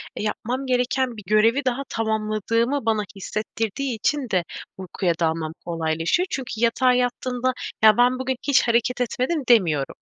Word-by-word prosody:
e, -, -, -4 dB
yapmam 245 Hz, +5 st, -3 dB
gereken 250 Hz, -1 st, 0 dB
bir 210 Hz, -, -9 dB
görevi 225 Hz, +6 st, +3 dB
daha 255 Hz, +2 st, 0 dB
tamamladığımı 225 Hz, +4 st, -1 dB
bana 220 Hz, -2 st, +1 dB
hissettirdiği 220 Hz, +5 st, -3 dB
için 265 Hz, +4 st, -1 dB
de 185 Hz, -3 st, +1 dB, 0.3 s
uykuya 185 Hz, -1 st, -1 dB
dalmam 160 Hz, -1 st, -1 dB
kolaylaşıyor. 165 Hz, -, 0 dB
Çünkü 260 Hz, -3 st, -4 dB
yatağa 240 Hz, +3 st, +3 dB
yattığında, 250 Hz, 0 st, 0 dB, 0.3 s
"Ya 215 Hz, -1 st, +7 dB
ben 250 Hz, +1 st, +3 dB
bugün 260 Hz, 0 st, -1 dB
hiç 280 Hz, -1 st, +5 dB
hareket 240 Hz, +2 st, +1 dB
etmedim." 255 Hz, +6 st, -1 dB
demiyorum. 165 Hz, -, +3 dB
235 Hz, 145 wpm, -23 LUFS, 210-255 Hz, 0.3 s, Ya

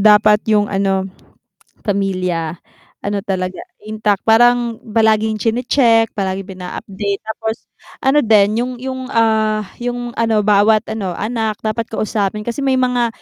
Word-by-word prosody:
dapat 210 Hz, 0 st, +5 dB
yung 210 Hz, -1 st, +4 dB
ano, 195 Hz, -1 st, +1 dB, 0.8 s
pamilya 185 Hz, -5 st, -1 dB, 0.4 s
ano 200 Hz, -1 st, -2 dB
talaga 185 Hz, -2 st, -3 dB, 0.2 s
intact 215 Hz, -1 st, -1 dB
parang 240 Hz, +1 st, +4 dB, 0.2 s
palaging 220 Hz, -1 st, +2 dB
chine-check 230 Hz, 0 st, +2 dB
palaging 195 Hz, -1 st, -3 dB
pin 190 Hz, -1 st, -11 dB
ina-update 200 Hz, +2 st, -4 dB
tapos 220 Hz, +1 st, -4 dB, 0.4 s
ano 270 Hz, +3 st, +4 dB
din 215 Hz, -3 st, +3 dB
yung 250 Hz, +1 st, -1 dB
yung, 260 Hz, +1 st, -5 dB
ah, 220 Hz, -2 st, +2 dB, 0.2 s
yung 245 Hz, 0 st, -3 dB
ano 225 Hz, -2 st, +2 dB
bawat 210 Hz, +1 st, +4 dB
ano, 195 Hz, -5 st, -3 dB
anak 220 Hz, -1 st, -3 dB
dapat 220 Hz, +1 st, -2 dB
kausapin 210 Hz, -1 st, -2 dB
kasi 235 Hz, +4 st, -4 dB
may 270 Hz, -1 st, +1 dB
mga 250 Hz, -2 st, +1 dB
215 Hz, 130 wpm, -17 LUFS, 200-230 Hz, 0.8 s, dapat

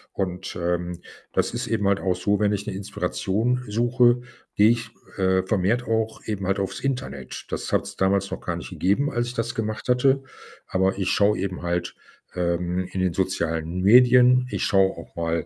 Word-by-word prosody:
Und, 95 Hz, 0 st, -3 dB
ähm, 85 Hz, 0 st, -2 dB, 0.3 s
das -, -, 0 dB
ist -, -, -3 dB
eben 105 Hz, -3 st, 0 dB
halt 100 Hz, 0 st, +2 dB
auch 95 Hz, -2 st, +1 dB
so, 100 Hz, +2 st, 0 dB
wenn 105 Hz, -1 st, +2 dB
ich 100 Hz, 0 st, -3 dB
'ne -, -, -3 dB
Inspiration 110 Hz, +5 st, -1 dB
suche, 120 Hz, +3 st, +3 dB, 0.3 s
gehe 105 Hz, +1 st, +6 dB
ich, 120 Hz, 0 st, -2 dB, 0.3 s
äh, 95 Hz, -1 st, +2 dB
vermehrt 105 Hz, +5 st, +1 dB
auch 110 Hz, 0 st, -1 dB
eben 100 Hz, -3 st, -3 dB
halt 95 Hz, +1 st, +1 dB
aufs 95 Hz, 0 st, -3 dB
Internet. 100 Hz, -, -4 dB
Das -, -, -4 dB
hat's -, -, -1 dB
damals 95 Hz, 0 st, +1 dB
noch -, -, -5 dB
gar -, -, -3 dB
nicht -, -, -8 dB
gegeben, 105 Hz, +11 st, +1 dB
als 120 Hz, 0 st, -1 dB
ich 120 Hz, -, -5 dB
das 120 Hz, +1 st, -2 dB
gemacht 110 Hz, -1 st, -3 dB
hatte. 130 Hz, +2 st, +3 dB, 0.5 s
Aber 95 Hz, +1 st, +1 dB
ich 95 Hz, -1 st, -1 dB
schau 105 Hz, +1 st, +3 dB
eben 95 Hz, -2 st, -3 dB
halt, 85 Hz, 0 st, -2 dB, 0.4 s
ähm, 90 Hz, +1 st, -1 dB
in 95 Hz, -, -3 dB
den 95 Hz, -2 st, +1 dB
sozialen 85 Hz, -2 st, -1 dB
Medien. 125 Hz, +4 st, +6 dB
Ich -, -, -2 dB
schau 95 Hz, -2 st, +3 dB
auch 85 Hz, -, -12 dB
mal 85 Hz, 0 st, -1 dB
100 Hz, 185 wpm, -24 LUFS, 90-115 Hz, 0.5 s, gehe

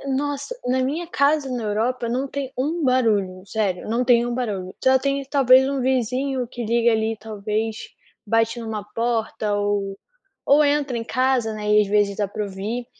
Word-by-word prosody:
nossa, 290 Hz, -, -3 dB
na 260 Hz, +1 st, +2 dB
minha 310 Hz, +7 st, -2 dB
casa 285 Hz, -2 st, +1 dB
na 245 Hz, -2 st, -3 dB
Europa 230 Hz, +3 st, -1 dB
não 255 Hz, +3 st, -1 dB
tem 275 Hz, -1 st, -5 dB
um 310 Hz, +5 st, -1 dB
barulho, 210 Hz, -8 st, +1 dB
sério, 195 Hz, -2 st, -2 dB
não 235 Hz, +3 st, 0 dB
tem 240 Hz, -1 st, +4 dB
um 240 Hz, -, -2 dB
barulho. 205 Hz, -7 st, -3 dB
Só 260 Hz, 0 st, +5 dB
tem 275 Hz, +1 st, -1 dB
talvez 265 Hz, -1 st, +5 dB
um 275 Hz, -, -1 dB
vizinho 255 Hz, +1 st, 0 dB
que 240 Hz, 0 st, -6 dB
liga 235 Hz, +1 st, +3 dB
ali 220 Hz, 0 st, 0 dB
talvez, 215 Hz, +1 st, -3 dB, 0.5 s
bate 225 Hz, +2 st, +1 dB
em -, -, -6 dB
uma 220 Hz, -2 st, -4 dB
porta 225 Hz, -2 st, -1 dB
ou 205 Hz, -1 st, -1 dB, 0.5 s
ou 290 Hz, +2 st, +5 dB
entra 285 Hz, -3 st, +1 dB
em 230 Hz, -, -4 dB
casa, 255 Hz, -3 st, +1 dB
né, 210 Hz, 0 st, -2 dB
e 210 Hz, -, +6 dB
às 205 Hz, -, -1 dB
vezes 205 Hz, -1 st, +1 dB
dá 205 Hz, -, 0 dB
para 210 Hz, +2 st, -4 dB
ouvir. 205 Hz, +5 st, -4 dB
235 Hz, 185 wpm, -22 LUFS, 210-265 Hz, 0.5 s, e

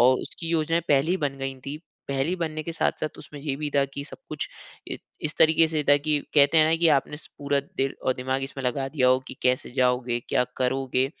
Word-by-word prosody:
और 125 Hz, +2 st, +6 dB
उसकी 165 Hz, -, -6 dB
योजनाएँ 165 Hz, 0 st, +1 dB
पहले 145 Hz, +3 st, +3 dB
ही 185 Hz, -, +3 dB
बन 145 Hz, -5 st, -2 dB
गयी 135 Hz, 0 st, -4 dB
थी। 140 Hz, +2 st, -3 dB, 0.3 s
पहले 135 Hz, +1 st, 0 dB
ही 180 Hz, -, 0 dB
बनने 155 Hz, -3 st, -3 dB
के 165 Hz, -, -5 dB
साथ-साथ 155 Hz, -1 st, -1 dB
उसमें, 150 Hz, -, -10 dB
ये 140 Hz, -1 st, -2 dB
भी 150 Hz, +1 st, -3 dB
था 140 Hz, -1 st, +3 dB
की 140 Hz, -, -4 dB
सब -, -, -9 dB
कुछ -, -, -3 dB, 0.4 s
इ -, -, -2 dB, 0.3 s
इस 155 Hz, 0 st, -1 dB
तरीके 160 Hz, +1 st, +6 dB
से 155 Hz, -1 st, 0 dB
था 145 Hz, -, +8 dB
कि 150 Hz, +1 st, +1 dB, 0.2 s
कहते 145 Hz, +2 st, +6 dB
है 155 Hz, -, +7 dB
ना, 160 Hz, -, +4 dB
की 170 Hz, 0 st, +3 dB
आपने 150 Hz, 0 st, +2 dB
स 150 Hz, -, -10 dB
पूरा 140 Hz, -1 st, +1 dB, 0.2 s
दिल 135 Hz, 0 st, 0 dB
और 130 Hz, -, +2 dB
दिमाग 130 Hz, +1 st, -2 dB
इसमें 135 Hz, 0 st, -5 dB
लगा 135 Hz, +2 st, 0 dB
दिया 130 Hz, -3 st, +2 dB
हो 130 Hz, -, +5 dB
की -, -, -6 dB
कैसे 125 Hz, 0 st, +1 dB
जाओगे, 125 Hz, -1 st, +1 dB
क्या 125 Hz, -, +2 dB
करोगे, 130 Hz, 0 st, +1 dB
140 Hz, 240 wpm, -26 LUFS, 130-155 Hz, 0.4 s, था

